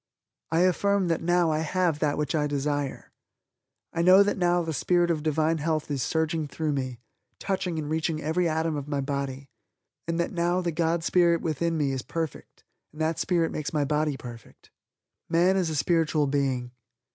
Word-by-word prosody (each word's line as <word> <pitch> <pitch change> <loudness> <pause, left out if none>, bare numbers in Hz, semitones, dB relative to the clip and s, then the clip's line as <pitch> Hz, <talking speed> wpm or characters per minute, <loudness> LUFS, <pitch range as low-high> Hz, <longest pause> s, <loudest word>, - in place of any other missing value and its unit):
I 165 +1 +3
affirm 190 +1 +2
that 165 - 0
now 175 -1 +2
I 155 - 0
have 165 -1 0
that 150 -1 0
which 150 -2 -1
I 150 -2 +1
desire. 145 -1 -2 0.8
I 170 - 0
know 185 +3 +7
that 205 - 0
now 175 -1 +2
the 165 -1 -3
Spirit 175 +3 +2
of 155 -2 -1
divine 155 +1 +1
health 155 -1 -1
is 140 -2 -1
surging 160 +2 -1
through 155 +1 -2
me, 130 -3 -3 0.4
touching 190 -3 -2
and 155 -2 -3
reaching 160 0 -1
every 160 +3 0
atom 160 0 0
of 145 -1 -5
my 145 -1 -1
body 140 -1 -4 0.6
and 165 0 -1
that 170 - 0
now 175 +1 +1
the 175 -2 -1
God 165 +1 0
Spirit 170 -1 +3
within 165 +1 -1
me 145 -3 +1
is 135 -1 -2
perfect 165 0 -6 0.3
and 150 - -14
that 160 +1 0
Spirit 170 -3 +1
makes 155 0 -4
my 150 -2 +1
body 150 -1 0
perfect. 120 -4 -12 0.6
"Man 175 +3 +3
is 185 -4 +1
a 155 - -3
Spiritual 155 0 +2
Being. 135 -3 -1
160 Hz, 185 wpm, -26 LUFS, 145-170 Hz, 0.8 s, know